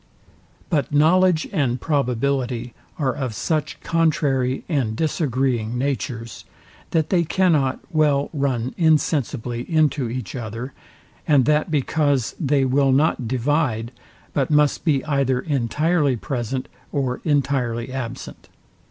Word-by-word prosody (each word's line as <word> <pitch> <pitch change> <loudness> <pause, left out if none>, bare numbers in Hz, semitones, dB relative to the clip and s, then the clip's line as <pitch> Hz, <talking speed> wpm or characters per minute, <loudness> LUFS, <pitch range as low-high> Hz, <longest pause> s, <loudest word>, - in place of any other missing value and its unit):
But 145 -5 0
knowledge 165 +3 +4
and 130 -4 0
probability 125 -4 -1 0.2
are 135 -4 0
of 130 -5 -4
such 155 +2 -2
contrary 140 -6 +1
and 130 -9 0
disagreeing 130 -6 0
natures, 125 -3 -3 0.5
that 160 -2 0
they 175 -3 +3
cannot 155 -6 +1
well 150 -3 +2
run 130 -4 -1
insensibly 145 -7 +1
into 150 -5 +2
each 125 +3 -5
other, 120 +2 -5 0.5
and 140 -5 +4
that 150 +3 +2
because 145 -3 0
they 140 -4 +2
will 135 +1 +3
not 135 -3 +2
divide, 125 -2 0 0.4
but 135 -2 0
must 150 -1 +2
be 145 -4 +1
either 140 -4 +1
entirely 145 - +1
present, 130 +1 -3 0.2
or 130 -3 -1
entirely 130 -5 0
absent. 125 -2 -6
140 Hz, 115 wpm, -22 LUFS, 125-150 Hz, 0.5 s, knowledge